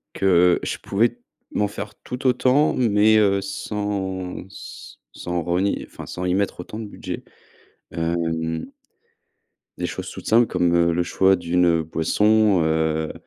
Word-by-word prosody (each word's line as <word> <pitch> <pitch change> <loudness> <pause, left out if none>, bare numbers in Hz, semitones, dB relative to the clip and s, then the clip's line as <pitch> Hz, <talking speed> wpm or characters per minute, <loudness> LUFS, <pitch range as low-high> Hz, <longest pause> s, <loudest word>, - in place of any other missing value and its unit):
que 90 -2 +4
je - - -3
pouvais 115 +4 0 0.3
m'en 105 - 0
faire 105 +1 -7
tout 125 +2 -5
autant, 130 +4 +3
mais, 110 -2 +4
heu, 100 -2 +3
sans 95 -2 -4
s 95 - -11 0.2
sans 90 -1 -3
renier, 90 +4 -1
enfin - - -10
sans 90 - -5
y 90 0 +1
mettre 100 -2 -1
autant 105 +5 -8
de 110 - -5
budget, 100 - -7 0.7
hem 80 -1 -2 1.1
des - - -1
choses - - -6
toutes - - -10
simples 115 +2 +5
comme, 90 -1 +1
heu, 85 0 +3
le 85 +1 +1
choix 95 +2 +3
d'une, 90 0 +1
heu, 85 -1 +3
boisson, 105 +4 +2
heu 80 0 0
95 Hz, 150 wpm, -22 LUFS, 85-105 Hz, 1.1 s, simples